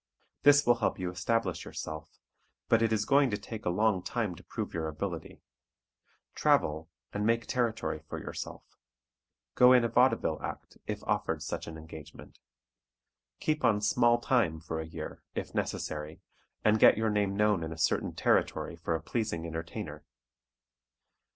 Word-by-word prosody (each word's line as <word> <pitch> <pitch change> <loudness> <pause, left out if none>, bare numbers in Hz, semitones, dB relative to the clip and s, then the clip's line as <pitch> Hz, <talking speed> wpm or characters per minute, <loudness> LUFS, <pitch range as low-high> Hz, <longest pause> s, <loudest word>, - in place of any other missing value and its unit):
This 145 +1 +6
will 120 0 +5
help 115 - 0
you 90 -1 -3
establish 95 +1 -1
yourself, 80 0 -7 0.5
but 115 - +4
it 115 -1 +2
is 110 -1 +1
going 140 +1 +4
to 105 - -1
take 105 +2 -8
a - - +2
long 105 +1 +2
time 105 +1 -2
to 85 - -13
prove - - -5
your 80 -1 -2
ability. 80 +2 -5 0.9
Travel, 80 +2 +2 0.2
and 105 - -1
make 115 +1 +2
territory 115 -10 -1
for 80 - -8
yourself. - - -6 0.9
Go 125 0 +7
in 125 -2 +6
a - - +2
vaudeville 125 +3 +2
act, - - -7
if - - -4
offered - - -1
such - - -4
an 80 - -7
engagement. 80 -1 -12 1.0
Keep 155 -1 -1
on 105 -2 +4
"small 120 +3 +3
time" 110 -11 +1
for 80 0 -5
a 80 - -7
year, 80 -1 -7
if - - -4
necessary, 75 +1 -3 0.5
and 110 0 +4
get - - +7
your 110 0 +1
name 100 -2 +1
known 105 -3 +3
in 80 - -4
a 80 - -6
certain 80 0 +1
territory - - +1
for 80 - -2
a 80 - -3
pleasing 105 -6 -2
entertainer. 80 0 -6
105 Hz, 160 wpm, -30 LUFS, 80-115 Hz, 1.0 s, Go